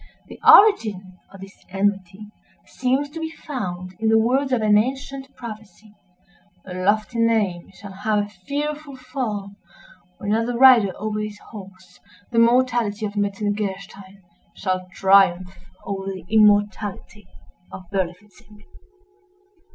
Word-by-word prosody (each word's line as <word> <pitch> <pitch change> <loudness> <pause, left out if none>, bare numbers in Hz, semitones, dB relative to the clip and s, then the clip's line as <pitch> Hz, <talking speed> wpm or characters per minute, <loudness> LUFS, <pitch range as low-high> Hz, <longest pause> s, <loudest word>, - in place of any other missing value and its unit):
The - - -11
origin 205 - +5
of 195 - -13
this 195 0 -13
enmity 195 +1 -2 0.3
seems 265 +3 -1
to 325 - -7
be 320 0 -4
found 185 - -6
in 220 0 +1
the 225 - +5
words 260 +5 +1
of 240 -4 +1
an 210 -1 +4
ancient 270 +4 -2
prophecy—"A 195 -5 -14
lofty 215 +5 0
name 215 -7 0
shall 200 -1 -11
have 210 +2 -1
a 205 0 0
fearful 285 +9 -5
fall 250 -6 -5 0.7
when, 205 +1 -2
as 225 +1 0
the 245 -1 -2
rider 245 -6 +6
over 215 0 -3
his 210 -1 -5
horse, 190 -3 -13 0.3
the 230 - +2
mortality 235 -3 +2
of 205 0 -6
Metzengerstein 200 -1 -4 0.3
shall 185 -1 -3
triumph 190 -1 +3 0.3
over 195 -1 -5
the 190 -3 -6
immortality 210 -1 +1 0.4
of 185 - -9
Berlifitzing." 200 +2 -6
210 Hz, 125 wpm, -22 LUFS, 195-230 Hz, 0.7 s, rider